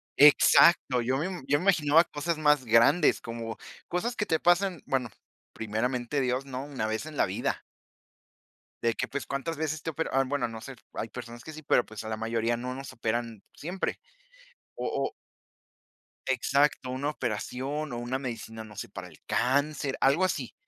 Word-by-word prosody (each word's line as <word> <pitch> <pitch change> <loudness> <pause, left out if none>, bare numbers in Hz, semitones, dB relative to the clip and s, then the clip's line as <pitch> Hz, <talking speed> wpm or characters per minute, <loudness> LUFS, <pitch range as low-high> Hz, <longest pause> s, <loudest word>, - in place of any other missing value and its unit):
exacto, 140 -2 +6
yo 130 +3 0
me 150 - -1 0.2
yo 145 - +4
me 170 - -4
imaginaba 165 -4 +5
cosas 165 +1 -3
más 150 -3 +3
grandes, 115 +9 +5
como 115 -1 -6 0.3
cosas 235 +8 -1
que 210 - 0
te 160 - +2
pasan, 175 -2 +3
bueno, 130 -3 0 0.4
primeramente 120 +5 -1
Dios, 130 +1 0
¿no?, 135 0 -5
una 140 -7 -3
vez 110 +5 -2
en 155 -1 -8
la - - +4
vida. - - -2 1.2
De 115 0 +2
que, - - -2
pues, 140 0 -4
cuántas 140 +4 -3
veces 155 0 -2
te 165 - -3
operan, 160 +1 -3
am, 135 -1 +2
bueno, 140 -3 0
no 115 -1 -8
sé, 135 +2 -8 0.2
hay 115 - -4
personas 120 +1 -9
que 160 - -8
sí, 155 0 -10
pero, 125 - +3
pues, 110 -1 -8
a 110 - -6
la 110 - -2
mayoría, 115 +1 0
no 125 +2 -4
nos 135 +1 -8
operan 115 -2 -2
siempre, 180 +5 -3 0.8
o - - -3
o - - -1 1.1
Exacto, 135 +1 +2
una 130 +3 -1
operación 135 +3 -3
o - - -3
una 120 +2 -2
medicina, 115 -3 -6
no 105 -1 -13
sé, - - -6
para - - -8
el - - -17
cáncer, 140 +3 +1
algo 140 +8 +4
así. 185 - -2
135 Hz, 180 wpm, -28 LUFS, 115-150 Hz, 1.2 s, exacto